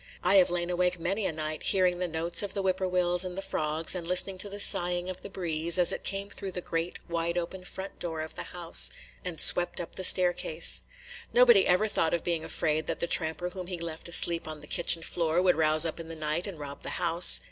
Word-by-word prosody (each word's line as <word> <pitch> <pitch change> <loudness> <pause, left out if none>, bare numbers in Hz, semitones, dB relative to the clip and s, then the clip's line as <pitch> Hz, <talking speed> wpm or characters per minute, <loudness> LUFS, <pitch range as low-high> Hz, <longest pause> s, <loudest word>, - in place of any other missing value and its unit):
I 185 +2 +4
have 185 - +4
lain 175 0 -2
awake 180 0 -1
many 195 +5 -2
a - - -2
night 155 0 -6
hearing 185 -2 +1
the 180 - -2
notes 165 +1 -1
of 205 - -3
the 200 - -1
whippoorwills 180 -1 0
and 185 0 -6
the - - -3
frogs, 155 +1 -2
and 175 -3 -4
listening 185 +1 +1
to 205 - -7
the 200 +1 -8
sighing 175 -1 +3
of 185 - -7
the - - -9
breeze, 170 -3 0
as 180 -1 +7
it - - -4
came 200 +1 -4
through 195 -2 -7
the 180 - -2
great 165 0 -4
wide 170 0 -2
open 180 +2 -5
front 190 +1 -9
door 165 -2 -5
of 160 - -8
the - - -7
house, 175 -2 -1 0.3
and 175 -3 -5
swept 175 0 +6
up 170 - -7
the 185 - -5
staircase. 175 -3 +4 0.5
Nobody 240 -5 +5
ever 185 +5 +2
thought 165 -5 0
of 170 - -5
being 170 -2 -2
afraid 155 -1 -2
that - - -3
the - - -1
tramper 165 +1 -1
whom 185 -1 -8
he 180 -1 -5
left 165 0 -7
asleep 170 -1 +4
on 155 -1 -8
the - - -11
kitchen 170 +1 0
floor 165 0 -1
would 180 0 +2
rouse 155 0 +4
up 165 - -4
in 165 - -8
the 165 - -8
night 155 +4 -3
and 195 -4 -8
rob 140 -1 -9
the - - -4
house. 170 0 +5
175 Hz, 235 wpm, -27 LUFS, 165-185 Hz, 0.5 s, as